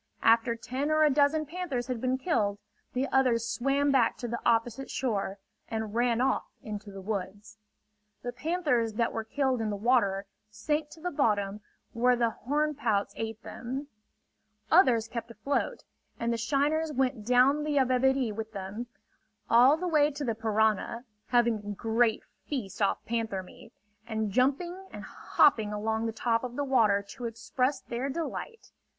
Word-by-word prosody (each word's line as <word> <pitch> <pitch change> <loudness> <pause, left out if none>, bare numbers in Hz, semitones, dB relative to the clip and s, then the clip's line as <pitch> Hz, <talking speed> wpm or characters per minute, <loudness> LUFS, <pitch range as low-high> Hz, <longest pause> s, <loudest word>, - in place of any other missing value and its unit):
After 230 +1 +4
ten 260 +5 -3
or 310 0 +4
a 300 - +5
dozen 295 +2 +3
panthers 300 -6 -3
had 250 -2 -4
been 255 0 +1
killed, 215 - 0 0.4
the 260 +2 0
others 240 -4 +2
swam 275 +5 +1
back 250 -4 +3
to 245 - -4
the 235 +1 -3
opposite 235 +3 +1
shore 205 -6 -2 0.3
and 220 -2 -4
ran 240 0 +2
off 260 - +1 0.2
into 210 -1 -6
the 195 -1 -9
woods. 205 +1 -5 0.6
The 245 - -3
panthers 250 -5 0
that 230 +1 0
were 225 - -2
killed 260 +1 0
in 220 - -1
the 205 - -2
water, 200 -3 +2 0.2
sank 295 +8 -2
to 320 - -14
the 360 +2 -2
bottom 210 -7 0 0.3
where 245 +2 +3
the 235 -1 +1
horn 295 +7 -1
pouts 220 -8 0
ate 225 0 -5
them. 265 +5 -6 0.8
Others 250 - +5
kept 235 0 -5
afloat, 250 +5 -2 0.4
and 235 0 0
the - - 0
shiners 295 +6 +1
went 260 -4 0
down 255 +6 +4
the 300 -1 -1
Yabebirì 260 -2 +2
with 220 +1 -6
them, 200 +4 -5 0.6
all 250 +6 +7
the 360 +2 -3
way 300 -3 +4
to 290 0 -5
the 230 - 0
Parana, 220 +2 0 0.2
having 235 -2 +3
a 205 0 -6
great 225 +1 +1 0.2
feast 235 -8 -4
off 200 - +1
panther 225 -5 -2
meat, 180 - -15 0.4
and 220 -2 -2
jumping 345 - 0
and - - -8
hopping 220 -7 +2
along 220 +2 -1
the - - -1
top 230 +1 0
of 245 -1 -5
the 285 - -1
water 215 -7 +3
to 240 +4 -8
express 255 +4 -1
their 245 +3 -3
delight. 335 - -5
240 Hz, 165 wpm, -29 LUFS, 220-275 Hz, 0.8 s, all